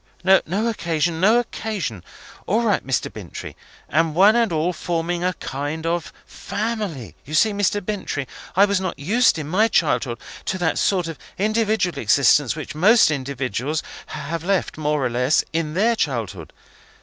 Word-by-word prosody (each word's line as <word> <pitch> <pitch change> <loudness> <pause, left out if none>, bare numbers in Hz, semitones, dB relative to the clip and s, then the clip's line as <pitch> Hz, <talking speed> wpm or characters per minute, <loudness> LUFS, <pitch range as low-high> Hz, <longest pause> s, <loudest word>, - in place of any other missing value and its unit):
"No 190 +3 +3
occasion, 170 -6 -1
no 215 +5 +5
occasion. 210 - -3 0.4
All 220 +5 +2
right, 210 -4 +1
Mr. 135 -1 -1
Bintrey. - - -8 0.3
And 160 -1 +1
one 200 +5 +6
and 235 -4 +2
all 165 +3 0
forming 170 0 -2
a 180 -1 0
kind 145 +4 -4
of 170 0 -1
family! 205 - -4
You 150 +4 -5
see, 220 +6 +4
Mr. 205 -1 0
Bintrey, 190 -10 -3 0.3
I 195 +2 +6
was 200 -2 0
not 185 -2 -3
used 210 - +3
in 150 -2 -5
my 200 +8 +3
childhood 130 - +1 0.3
to 190 - -1
that 175 -3 0
sort 180 -4 +1
of 165 - -7 0.2
individual 210 -5 0
existence 135 +4 +4
which 155 -4 -6
most 200 +5 +5
individuals 135 0 -2 0.2
have 160 +3 -5
led, 195 0 0
more 150 -2 0
or - - +1
less, 125 +4 +2
in 160 -1 -2
their 225 +5 +3
childhood. 110 - -3
170 Hz, 160 wpm, -22 LUFS, 145-205 Hz, 0.4 s, one